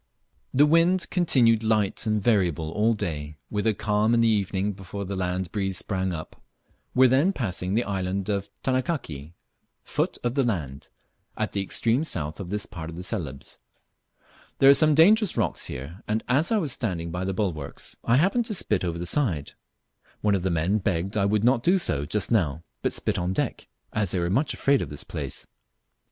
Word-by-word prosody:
The 145 +3 +5
wind 165 +4 +3
continued 125 - +3
light 110 -2 +1
and 105 -2 0
variable 85 -8 +1
all 110 +5 +2
day, 75 -7 -4
with 105 +1 -1
a 110 - +2
calm 105 +2 +1
in 115 - +3
the 115 - +4
evening 100 -1 0
before 100 +1 -7
the 100 +1 -4
land 90 -1 -2
breeze 95 -3 -1
sprang 95 -2 -1
up, 80 -2 -7 0.5
were 130 +1 +7
then 135 +9 +3
passing 95 - -2
the 120 - +2
island 95 -1 -2
of 100 -1 -2
"Tanakaki" 125 - -2 0.5
(foot - - -2
of 120 0 0
the 140 - +2
land), 80 - -3 0.5
at - - -1
the 100 - -1
extreme 115 +7 +1
south 80 - -2
of 95 -3 -6
this 105 +1 -2
part 80 -2 -8
of 85 - -8
Celebes. 75 - -4 1.0
There 135 0 +7
are - - +9
some 155 +1 +5
dangerous 200 - +5
rocks 105 -8 0
here, 75 +9 -7
and 110 +1 -1
as 140 - +2
I 225 - +3
was 160 -9 0
standing 90 -10 -3
by 90 +2 -3
the 95 - -1
bulwarks, 85 -9 -3
I 120 +2 +3
happened 200 - +2
to 215 - -1
spit 105 - 0
over 85 -2 -2
the 85 - -4
side; 85 - 0 0.7
one 105 -1 +2
of 95 - +1
the 95 - 0
men 85 +5 +1
begged 95 0 -1
I 100 -2 +2
would 105 +1 +1
not 120 0 +3
do 180 +8 +3
so 75 - -1
just 105 +7 -2
now, 85 -8 +1 0.2
but - - 0
spit - - -1
on 90 +1 -1
deck, - - -2 0.3
as 105 -4 0
they 95 - 0
were 85 0 -1
much 135 +8 +1
afraid 140 -1 +2
of - - -4
this 75 -1 -6
place. - - -6
100 Hz, 195 wpm, -25 LUFS, 90-120 Hz, 1.0 s, are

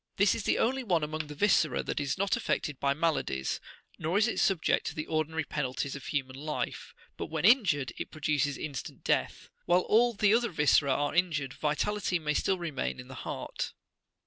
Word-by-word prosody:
This 200 +1 +4
is 215 - -4
the - - +2
only 260 +3 +1
one69 175 -8 +1
among 155 0 -3
the 150 - -8
viscera 160 -6 +3
that - - -2
is 140 -2 -1
not 200 +1 +1
affected 150 - -2
by 140 0 +1
maladies, 150 - -1 0.4
nor 165 +5 0
is 215 +2 +4
it 235 - -1
subject 190 -5 +2
to - - -4
the 155 - -3
ordinary 155 0 -1
penalties 140 -1 -3
of 140 - -8
human 130 -4 -2
life; 150 +2 -4 0.2
but - - -4
when - - -2
injured, 170 - +4
it - - -4
produces 150 -2 0
instant 145 -4 -6
death. - - -1 0.2
While 175 +1 +4
all 235 +5 +3
the 205 0 +4
other 235 0 +3
viscera 150 -4 +3
are 145 +2 0
injured, 160 -6 +1
vitality 180 +5 0
may 150 -2 -1
still 190 +5 +1
remain 140 - -3
in - - -10
the - - -8
heart. - - -5
155 Hz, 195 wpm, -30 LUFS, 145-195 Hz, 0.4 s, This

